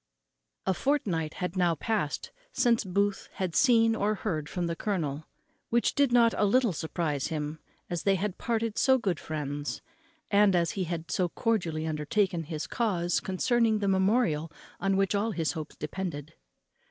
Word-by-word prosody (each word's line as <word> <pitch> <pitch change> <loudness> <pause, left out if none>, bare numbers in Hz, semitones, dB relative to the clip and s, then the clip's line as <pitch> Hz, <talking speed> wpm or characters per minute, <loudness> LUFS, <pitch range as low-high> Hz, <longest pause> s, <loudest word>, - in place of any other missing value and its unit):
_ - - -55 0.6
A 190 - +2
fortnight 180 - 0
had 180 -1 -3
now 175 -3 +2
passed 180 -3 -2 0.2
since 235 - +2
Booth 200 +1 -1
had 185 -3 -3
seen 230 -4 +5
or 210 0 +1
heard 155 -6 -3
from 175 -1 -2
the 170 0 -2
colonel, 160 -7 -2 0.4
which 235 0 +2
did 280 -3 +3
not 235 -1 +5
a - - +3
little 230 0 +3
surprize 160 -3 -2
him, 150 0 -4 0.3
as 175 -2 -3
they 195 -1 +3
had 195 0 -3
parted 230 -2 -1
so 265 -1 +5
good 190 -9 -1
friends, 145 -2 -4 0.5
and 200 -2 +5
as 170 -1 +2
he 190 -2 -2
had 165 -1 -4
so 180 -2 +1
cordially 170 -8 -1
undertaken 165 +3 0
his 155 -1 -4
cause 180 -7 0
concerning 225 +4 +1
the 205 -1 -1
memorial 190 -5 +2 0.3
on 195 +1 +1
which 195 0 +2
all 210 +2 0
his 165 -4 0
hopes 155 -3 -7
depended. 150 -2 -5
185 Hz, 165 wpm, -29 LUFS, 160-215 Hz, 0.6 s, seen